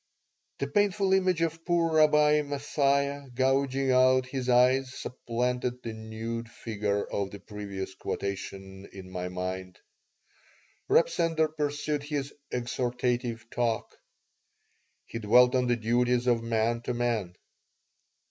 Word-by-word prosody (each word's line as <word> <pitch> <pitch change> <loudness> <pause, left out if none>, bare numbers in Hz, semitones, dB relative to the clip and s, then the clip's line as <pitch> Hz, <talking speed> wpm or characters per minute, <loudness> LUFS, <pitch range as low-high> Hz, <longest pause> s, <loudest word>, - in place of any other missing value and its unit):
The - - -1
painful 200 -1 +2
image 185 -3 +2
of 165 0 -2
poor 170 -2 +1
Rabbi 150 -1 +5
M 150 -1 -2
athia 140 -1 0
gouging 135 +1 +2
out 130 0 +4
his 130 0 -4
eyes 125 +1 +4
supplanted 125 +1 -3
the 115 - -4
nude 110 +1 -5
figure 105 -3 -2
of 100 -1 -3
the 100 - -9
previous 100 -2 -6
quotation 95 0 -5
in 95 -1 -10
my 90 0 -4
mind 90 0 -5 1.1
Reb - - +5
Sender 165 -2 +1
pursued 145 -1 -2
his 145 -1 -4 0.2
"exhortative 120 -1 -2
talk." 115 -2 -1 1.1
He 115 - -6
dwelt 125 +3 +5
on 125 -1 +2
the 120 - +3
duties 120 +2 +1
of 120 -2 +2
man 115 0 0
to 120 0 -3
man. 115 -7 -1
125 Hz, 125 wpm, -28 LUFS, 110-140 Hz, 1.1 s, Rabbi